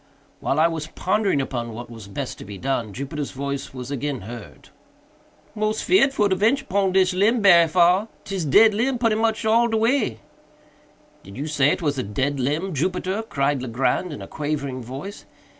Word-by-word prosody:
While 140 Hz, -, 0 dB
I 160 Hz, -, +5 dB
was 160 Hz, -2 st, -4 dB
pondering 190 Hz, 0 st, 0 dB
upon 120 Hz, -3 st, -4 dB
what 120 Hz, +2 st, -7 dB
was 115 Hz, -4 st, -11 dB
best 125 Hz, +6 st, -5 dB
to -, -, -8 dB
be 100 Hz, 0 st, -9 dB
done, 120 Hz, -3 st, -2 dB
Jupiter's 140 Hz, +5 st, -5 dB
voice 140 Hz, 0 st, -5 dB
was 125 Hz, 0 st, -7 dB
again 140 Hz, -2 st, -3 dB
heard. 115 Hz, +2 st, -10 dB, 0.8 s
"Mos 215 Hz, 0 st, -1 dB
feerd 320 Hz, -7 st, +4 dB
for 210 Hz, -6 st, +2 dB
to 190 Hz, -, +1 dB
ventur 230 Hz, +8 st, +2 dB
pon 195 Hz, 0 st, +1 dB
dis 185 Hz, -1 st, +3 dB
limb 210 Hz, +6 st, +3 dB
berry 175 Hz, -5 st, +6 dB
far—'tis 180 Hz, +2 st, +1 dB
dead 215 Hz, +10 st, +6 dB
limb 250 Hz, +5 st, 0 dB
putty 230 Hz, -2 st, +2 dB
much 220 Hz, 0 st, 0 dB
all 230 Hz, +2 st, +4 dB
de 225 Hz, -1 st, 0 dB
way." 225 Hz, -, +1 dB, 1.0 s
"Did 95 Hz, +3 st, -12 dB
you 140 Hz, -, -3 dB
say 150 Hz, -3 st, +2 dB
it 170 Hz, -, -1 dB
was 145 Hz, -3 st, 0 dB
a -, -, +1 dB
dead 130 Hz, +6 st, -2 dB
limb, 155 Hz, +9 st, -1 dB
Jupiter?" 185 Hz, +6 st, -1 dB
cried 140 Hz, -, -1 dB
Legrand 130 Hz, +8 st, -1 dB
in 145 Hz, -, -7 dB
a -, -, -9 dB
quavering 140 Hz, -4 st, -3 dB
voice. 135 Hz, -, -8 dB
155 Hz, 185 wpm, -23 LUFS, 135-205 Hz, 1.0 s, berry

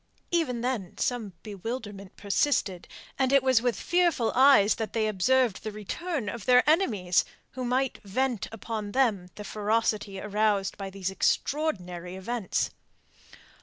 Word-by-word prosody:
Even 295 Hz, -9 st, 0 dB
then 240 Hz, -8 st, -3 dB
some 230 Hz, -6 st, -2 dB
bewilderment 205 Hz, -1 st, -6 dB
persisted, 200 Hz, -3 st, 0 dB, 0.3 s
and 265 Hz, -1 st, +2 dB
it 275 Hz, -1 st, +5 dB
was 260 Hz, -3 st, +4 dB
with 245 Hz, -1 st, 0 dB
fearful 345 Hz, -9 st, +2 dB
eyes 260 Hz, -6 st, +6 dB
that 220 Hz, -1 st, -4 dB
they 225 Hz, -1 st, +1 dB
observed 225 Hz, +2 st, +2 dB
the 220 Hz, -, -5 dB
return 240 Hz, -, -4 dB
of 230 Hz, 0 st, -5 dB
their 250 Hz, +1 st, +5 dB
enemies, 220 Hz, -, +3 dB, 0.3 s
who 255 Hz, -, -5 dB
might 255 Hz, +2 st, 0 dB
vent 240 Hz, +2 st, -1 dB
upon 215 Hz, -1 st, -5 dB
them 215 Hz, -9 st, +1 dB
the 210 Hz, -, -7 dB
ferocity 210 Hz, -1 st, -1 dB
aroused 210 Hz, -1 st, 0 dB
by 195 Hz, -1 st, -6 dB
these 190 Hz, -1 st, -4 dB
extraordinary 185 Hz, -, -1 dB
events. 205 Hz, +2 st, -2 dB
220 Hz, 135 wpm, -27 LUFS, 200-260 Hz, 0.3 s, eyes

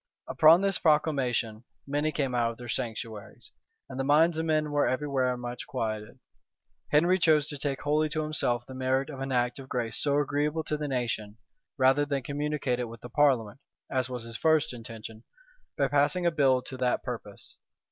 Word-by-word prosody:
Upon 160 Hz, +3 st, +6 dB
this 195 Hz, -1 st, +1 dB
proclamation 135 Hz, -8 st, +1 dB, 0.2 s
many 145 Hz, +2 st, 0 dB
came 135 Hz, -4 st, -1 dB
out 120 Hz, -1 st, +2 dB
of 115 Hz, -, -8 dB
their 120 Hz, -, -9 dB
sanctuaries; 115 Hz, -4 st, -5 dB, 0.4 s
and 130 Hz, -, -8 dB
the -, -, +1 dB
minds 155 Hz, +4 st, +4 dB
of 165 Hz, -, -2 dB
men 155 Hz, -1 st, +1 dB
were 145 Hz, 0 st, +2 dB
every 140 Hz, +3 st, -1 dB
where 130 Hz, -3 st, 0 dB
much 120 Hz, 0 st, -6 dB
quieted. 110 Hz, -4 st, -4 dB, 0.7 s
Henry 175 Hz, +5 st, +3 dB
chose 155 Hz, -4 st, +4 dB
to 145 Hz, -, -5 dB
take 135 Hz, -1 st, -3 dB
wholly 150 Hz, +1 st, +1 dB
to 155 Hz, +1 st, -2 dB
himself 120 Hz, -6 st, -1 dB
the 130 Hz, -, -10 dB
merit 130 Hz, +2 st, 0 dB
of 135 Hz, -, -8 dB
an 135 Hz, 0 st, -4 dB
act 125 Hz, +1 st, 0 dB
of 135 Hz, 0 st, -10 dB
grace 115 Hz, -3 st, -2 dB
so 145 Hz, -1 st, +2 dB
agreeable 145 Hz, +2 st, 0 dB
to 155 Hz, -, -2 dB
the 150 Hz, 0 st, -3 dB
nation, 115 Hz, -5 st, -3 dB, 0.4 s
rather 135 Hz, +2 st, +4 dB
than 140 Hz, -2 st, -2 dB
communicate 145 Hz, -3 st, -2 dB
it 125 Hz, -, -2 dB
with 115 Hz, 0 st, -11 dB
the 120 Hz, -, -9 dB
parliament, 125 Hz, -3 st, +2 dB, 0.3 s
(as 130 Hz, -1 st, 0 dB
was 125 Hz, -2 st, -5 dB
his 115 Hz, 0 st, -7 dB
first 160 Hz, -4 st, +2 dB
intention,) 115 Hz, -2 st, -9 dB, 0.5 s
by 140 Hz, -, +2 dB
passing 145 Hz, +6 st, +1 dB
a 170 Hz, -, +4 dB
bill 135 Hz, -5 st, +3 dB
to 130 Hz, -, -7 dB
that 125 Hz, -1 st, 0 dB
purpose. -, -, -7 dB
135 Hz, 190 wpm, -28 LUFS, 120-150 Hz, 0.7 s, Upon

